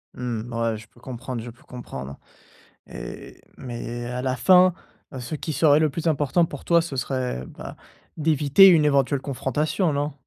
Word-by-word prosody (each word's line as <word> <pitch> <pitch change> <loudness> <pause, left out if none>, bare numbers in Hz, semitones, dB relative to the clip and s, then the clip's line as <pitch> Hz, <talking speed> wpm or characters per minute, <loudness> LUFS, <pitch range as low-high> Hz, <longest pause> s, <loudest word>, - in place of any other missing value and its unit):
Mmh, 120 -1 -4
ouais, 115 -1 -1
je 105 0 -13
peux 120 - -23
comprendre, 125 -1 -6
je 120 - -8
peux 115 - -16
comprendre 70 - -8 0.7
et - - -9 0.2
mais 120 -1 -6
à 125 +1 -4
la 130 -1 0
fin, 185 +6 +5 0.5
ce 125 +5 -5
qui 155 +1 -4
serait 150 -1 +4
le 155 -1 +3
plus 165 +3 -3
important 155 +2 +2
pour 145 -4 -9
toi, 170 -1 +4
ce 165 -4 -6
serait, 130 - -3
bah, - - -10 0.4
d'éviter 155 +3 +5
une 165 -5 +6
éventuelle 140 -1 +2
confrontation, 150 - -1
non? 145 +1 -2
135 Hz, 170 wpm, -24 LUFS, 120-155 Hz, 0.7 s, une